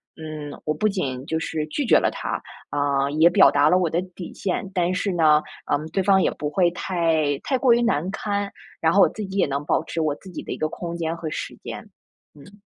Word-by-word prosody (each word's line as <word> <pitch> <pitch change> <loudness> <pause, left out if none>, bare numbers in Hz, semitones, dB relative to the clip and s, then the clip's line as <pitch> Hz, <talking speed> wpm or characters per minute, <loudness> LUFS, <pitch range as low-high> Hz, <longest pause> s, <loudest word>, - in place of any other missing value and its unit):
嗯， 155 -2 -7
我 155 - 0
不 215 - +1
仅 135 -10 -2
就 160 +2 -1
是 155 -1 -3
拒 270 - -2
绝 - - +6
了 - - +2
他， - - -4 0.3
啊， 140 -1 +1
也 165 +2 +7
表 175 - +6
达 145 +1 +4
了 180 - +5
我 180 -3 +1
的 170 +3 0
底 180 - -8
线， 190 0 -3
但 180 -1 +1
是 195 +2 -1
呢， 155 -3 +4 0.3
嗯， 150 +2 0
对 195 - 0
方 190 0 +4
也 - - +2
不 150 - -4
会 175 +1 +2
太 165 -6 0
太 265 - 0
过 250 -2 +4
于 240 - +3
难 185 -7 +1
堪， 205 -1 -2 0.3
然 160 0 +2
后 200 - +5
我 - - +6
自 215 - -6
己 195 +1 -6
也 - - +4
能 140 +1 -3
保 155 - +1
持 165 - -5
我 155 -2 0
自 190 - -13
己 180 - -6
的 - - -5
一 - - -7
个 155 - -1
空 170 +1 -6
间 165 -1 -2
和 165 -2 -4
时 - - -5
间。 - - -6 0.5
嗯。 195 +8 -16
165 Hz, 260 characters per minute, -23 LUFS, 150-190 Hz, 0.5 s, 也